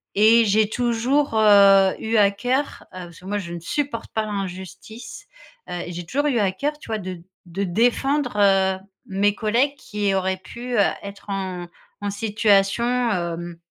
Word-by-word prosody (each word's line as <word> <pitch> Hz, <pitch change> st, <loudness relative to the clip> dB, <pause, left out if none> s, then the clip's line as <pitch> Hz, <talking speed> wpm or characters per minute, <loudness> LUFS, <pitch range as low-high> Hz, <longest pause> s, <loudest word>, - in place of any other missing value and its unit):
et 220 Hz, +3 st, +6 dB
j'ai 215 Hz, +1 st, +3 dB
toujours, 245 Hz, +4 st, 0 dB
heu, 200 Hz, -3 st, +6 dB
eu 225 Hz, +1 st, -1 dB
à 205 Hz, -2 st, +6 dB
cœur, 250 Hz, +7 st, -2 dB
heu, 185 Hz, -1 st, -7 dB
parce 170 Hz, -2 st, -14 dB
que -, -, -15 dB
moi 205 Hz, +2 st, -2 dB
je 170 Hz, -3 st, -7 dB
ne 170 Hz, -, -5 dB
supporte 275 Hz, -, -3 dB
pas 220 Hz, -1 st, -1 dB
l'injustice, 205 Hz, -, -7 dB, 0.4 s
heu, 175 Hz, -, -4 dB
j'ai 175 Hz, 0 st, -6 dB
toujours 285 Hz, -, -1 dB
eu 255 Hz, -5 st, +1 dB
à 200 Hz, -3 st, +2 dB
cœur 295 Hz, +9 st, -3 dB
tu -, -, -13 dB
vois 220 Hz, -, -1 dB
de 185 Hz, -3 st, -7 dB, 0.3 s
de 185 Hz, +4 st, -3 dB
défendre, 245 Hz, +8 st, +1 dB
heu, 195 Hz, -2 st, +3 dB, 0.3 s
mes 200 Hz, +1 st, +1 dB
collègues 240 Hz, +7 st, +1 dB
qui 205 Hz, -7 st, -2 dB
auraient 190 Hz, 0 st, 0 dB
pu 240 Hz, +6 st, -6 dB, 0.3 s
être 200 Hz, +1 st, -10 dB
en 185 Hz, -3 st, -4 dB, 0.3 s
en 205 Hz, -, -2 dB
situation 205 Hz, 0 st, +2 dB, 0.3 s
hem, 170 Hz, -2 st, -4 dB
205 Hz, 165 wpm, -22 LUFS, 190-235 Hz, 0.4 s, et